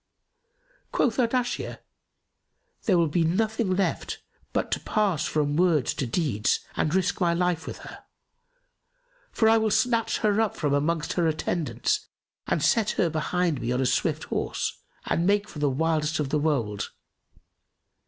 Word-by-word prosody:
Quoth 235 -3 +1
Ardashir, 245 0 0 1.1
"There 190 -5 +4
will 170 -1 +3
be 165 +3 +1
nothing 210 +3 +1
left 195 0 -2 0.3
but - - -1
to - - 0
pass 195 -7 0
from 145 0 0
words 165 -7 +3
to 135 -4 -3
deeds 115 - 0
and 155 +3 0
risk 190 +1 0
my 170 -1 +3
life 175 -2 0
with - - -5
her; - - -11 1.3
for 220 - +2
I 225 0 +6
will 220 0 +1
snatch 230 +1 +1
her 210 +1 +3
up 220 - 0
from 145 -3 0
amongst 155 +3 0
her 175 -2 +1
attendants 170 - -1 0.4
and - - 0
set 220 -2 +3
her 170 -4 +2
behind 160 -2 0
me 120 +1 -2
on 125 - 0
a 135 - +1
swift - - 0
horse - - -3 0.3
and 170 +2 +1
make 205 +1 +2
for 150 - -9
the 145 -1 +2
wildest 155 +2 0
of 145 -3 -1
the 150 - +1
wold. 120 -10 -1
170 Hz, 155 wpm, -26 LUFS, 150-205 Hz, 1.3 s, I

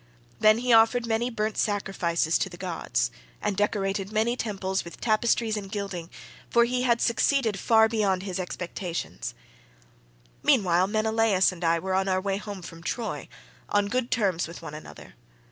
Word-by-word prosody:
Then 215 0 +6
he 245 0 +2
offered 225 +2 +5
many 230 +2 0
burnt 215 -2 -2
sacrifices 180 -6 0
to 190 - -1
the 175 - -11
gods, 160 - -2 0.3
and 205 - -1
decorated 195 -1 -1
many 225 +3 +1
temples 195 -5 -2
with 170 - -11
tapestries 225 0 +1
and 200 -2 -6
gilding, 195 -5 -4 0.4
for 235 0 +4
he 250 +1 -1
had 240 -2 +2
succeeded 235 -3 +2
far 220 +1 +5
beyond 200 -4 0
his 190 -2 -4
expectations. 175 - -5 1.1
"Meanwhile 180 -2 +3
Menelaus 220 -2 +2
and 180 -1 -9
I 165 0 +3
were 190 +3 -3
on 190 +1 +1
our 185 -1 +2
way 195 0 -1
home 205 -3 -7
from 165 -1 -10
Troy, 220 +6 -4 0.4
on 205 0 +2
good 250 +2 -1
terms 190 -8 +1
with 170 - -9
one 150 - -7
another. 155 - -11
200 Hz, 160 wpm, -26 LUFS, 185-225 Hz, 1.1 s, Then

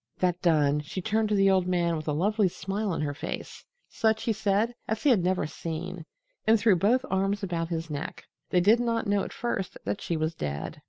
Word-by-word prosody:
That 180 -1 0
done, 150 -4 +3
she 150 +5 -6
turned 215 +3 0
to 210 - +2
the 195 -1 +5
old 185 -1 +2
man 175 -2 +1
with 155 -1 -5
a - - +1
lovely 200 +7 +2
smile 195 +4 -3
on 165 - -1
her 145 -1 -1
face 160 +3 -6 0.2
such, 220 -1 +1
he 225 - +1
said, 215 +2 +1
as 220 0 -2
he 290 - +5
had 205 -8 +3
never 180 -3 +1
seen 165 +2 -5 0.4
and 220 0 +5
threw 210 -2 +5
both 235 +9 +2
arms 195 +2 0
about 170 -3 -2
his 165 -2 -3
neck. 145 +1 -5 0.2
They 180 - +3
did 215 +6 +5
not 230 -1 0
know 205 -1 +1
at - - -6
first 225 -6 -3
that 200 - -2
she 170 - -2
was 155 +1 -1
dead. 75 - -5
185 Hz, 220 wpm, -27 LUFS, 165-215 Hz, 0.4 s, the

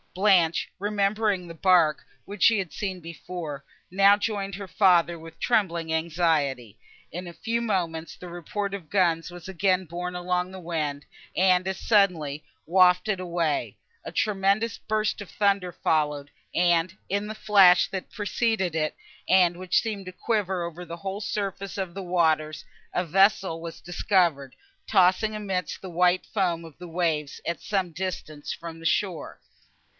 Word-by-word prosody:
Blanche, 185 -4 +3
remembering 205 -1 0
the 165 - -8
bark, 165 -3 +3 0.2
which 205 +1 -4
she 225 - +6
had 190 -4 -2 0.3
before 165 -3 -7 0.3
seen, - - -14
now 200 +1 +7
joined 200 -2 -2
her 200 0 -7
father, 175 -3 +3
with 165 0 -13
trembling 170 -8 0
anxiety. 155 - 0 0.3
In 180 +2 -6
a - - -7
few 230 +6 -2
moments, 170 -7 -2
the 180 - -10
report 185 +4 -4
of 180 -6 -7
guns 175 -3 +1
was 175 -1 -10
again 190 0 +1
borne 180 +2 -5
along 180 +1 -1
the 190 - -8
wind, 155 -5 -3 0.3
and 185 -1 +3
as 190 0 -3
suddenly 170 -9 +2 0.2
wafted 180 +3 +4
away; 170 -4 -1 0.3
a - - -7
tremendous 205 +1 +1
burst 215 -1 -1
of 200 - -9
thunder 195 +1 +1
followed, 150 -3 0 0.2
and, 175 +1 +2
in 200 +2 -1
the 215 - -6
flash, 195 -4 +6
that 190 -1 -4
had - - -41
preceded 205 -3 -1
it, 155 -1 -1 0.3
and 180 -2 +5
which 185 +1 +1
seemed 205 -4 -5
to - - -5
quiver 190 -2 -1
over 170 +1 -6
the 170 -1 -8
whole 195 +2 -5
surface 200 -1 -4
of 190 -3 -3
the 195 +1 -6
waters, 160 -4 +1 0.3
a 180 - 0
vessel 190 -1 +3
was 165 -1 -7
discovered, 170 -6 0 0.3
tossing 195 +2 +3
amidst 190 -5 -3
the 185 - -8
white 180 +1 +2
foam 175 -5 -1
of 160 -3 -13
the 180 - -8
waves 160 -4 -1
at 170 - -3
some 190 -4 -1
distance 160 -4 -5
from 165 -1 -7
the 165 - -12
shore. 180 +1 -1
180 Hz, 160 wpm, -26 LUFS, 165-195 Hz, 0.3 s, now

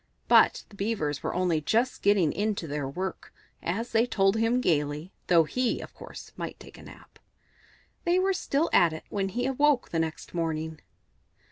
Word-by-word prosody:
But - - +5
the 205 - -15
Beavers 195 -8 -2
were - - -3
only 175 -3 +1
just 235 - 0
getting 195 -6 +3
into 205 -3 -1
their 145 -2 -3
work, 185 +7 -5 0.3
as 225 +8 -3
they 230 +2 +3
told 195 -3 +2
him 225 +2 +2
gaily, 150 - 0 0.2
though 170 -2 +6
he, 250 +10 -1
of - - -9
course, - - -11
might - - -6
take - - -13
a - - -12
nap. - - -15 0.8
They 345 0 +2
were 385 +1 +2
still 325 -3 0
at 170 -2 +5
it 160 - -7
when 195 -1 -1
he 245 +5 -2
awoke 270 -2 +2
next 160 -1 -2
morning. 160 -2 -3
195 Hz, 170 wpm, -27 LUFS, 160-235 Hz, 0.8 s, though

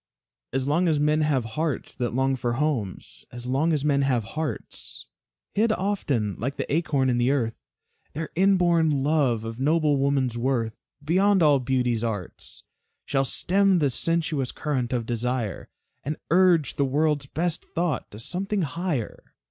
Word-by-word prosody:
As 130 +1 -1
long 165 +6 +2
as 155 -3 +2
men 150 +1 +2
have 140 -6 +1
hearts 150 +6 -3
that 120 -1 -2
long 135 +1 +2
for 120 -1 -2
homes, 125 -8 -2
As 120 0 -8
long 135 +6 +1
as 150 -2 0
men 140 -2 +3
have 130 -4 +1
hearts, 155 -7 -5 0.5
Hid 220 +2 +2
often 175 - -1
like 135 +6 -3
the - - -2
acorn 145 -5 +1
in 120 -1 +1
the 120 +1 +2
earth, 120 -5 0 0.6
Their 155 +2 -4
inborn 170 -6 +3
love 140 -7 +2
of 115 +1 -6
noble 150 +1 +2
woman's 135 -3 +1
worth, 115 -3 -1 0.2
Beyond 190 +4 +3
all 145 -3 +5
beauty's 125 -3 0
arts, 105 -6 -5 0.4
Shall 135 -1 +1
stem 185 - +2
the 145 -5 +2
sensuous 155 -3 0
current 130 -6 -2
of 120 -3 -1
desire, 120 -3 -2 0.3
And 150 +2 -3
urge 175 -5 +4
the 140 - +3
world's 145 +1 +1
best 170 +3 -1
thought 170 -5 -1
to 105 - -11
something 190 - -2
higher. 155 - -4
140 Hz, 155 wpm, -25 LUFS, 125-165 Hz, 0.6 s, all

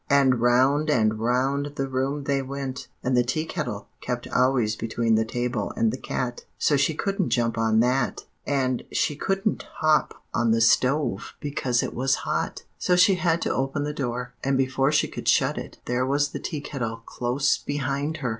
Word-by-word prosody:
And 135 -4 +4
round 130 +5 +3
and 110 -6 +2
round 135 +5 0
the 135 -1 -1
room 135 +2 -1
they 140 0 0
went, 135 0 -5 0.2
and 130 0 +1
the 125 - +5
Tea 155 +6 -1
Kettle 125 - -4
kept 125 -1 -3
always 125 -4 +2
between 115 0 0
the 110 0 +4
table 120 -1 -2
and 115 -1 +3
the - - -4
cat, 120 -1 -3
so 150 - +2
she 140 +3 +2
couldn't 195 +1 -1
jump 115 -2 +1
on 110 -1 +3
that; 125 +1 0 0.2
and 130 -3 0
she 150 - 0
couldn't 195 +7 -1
hop 155 -1 +2 0.2
on 120 -1 +2
the 115 +1 +3
stove 125 -1 +2
because 135 -4 0
it - - -4
was 135 +2 +1
hot; - - -2 0.2
so 180 - +2
she 185 +2 +6
had 170 -2 +1
to - - 0
open 135 +2 -1
the 150 0 -3
door. 125 -3 -3
And 135 0 +1
before 135 +1 +2
she 150 - +3
could - - -7
shut - - +3
it, - - -9
there 125 +1 0
was 145 +1 +2
the - - -6
Tea 150 -4 -4
Kettle 115 -5 -4
close 125 +4 0
behind 145 +2 -2
her!" 135 -5 -2
135 Hz, 190 wpm, -25 LUFS, 120-145 Hz, 0.2 s, she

